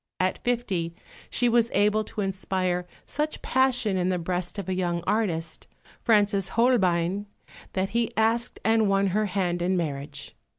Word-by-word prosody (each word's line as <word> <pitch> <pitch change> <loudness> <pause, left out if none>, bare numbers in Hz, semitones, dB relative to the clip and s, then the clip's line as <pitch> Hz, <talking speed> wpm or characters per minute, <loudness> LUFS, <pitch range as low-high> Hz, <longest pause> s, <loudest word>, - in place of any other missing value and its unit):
At 185 0 0
fifty 195 -9 -1 0.3
she 245 - +2
was 235 -1 +3
able 210 +2 +3
to 210 - -5
inspire 185 -2 -1 0.2
such 300 +1 -3
passion 250 -6 +2
in 180 0 +1
the 185 - +1
breast 175 +2 -3
of 200 - -4
a 190 - 0
young 175 -2 -1
artist, 175 -7 -1 0.3
Francis 205 -4 +3
Holbein, 195 -5 +2 0.5
that 190 0 0
he 230 +2 0
asked 230 +2 +1
and 220 -2 +3
won 195 0 +3
her 215 +1 +1
hand 180 -2 -1
in 185 +1 +1
marriage. 145 -4 -4
195 Hz, 155 wpm, -26 LUFS, 180-225 Hz, 0.5 s, was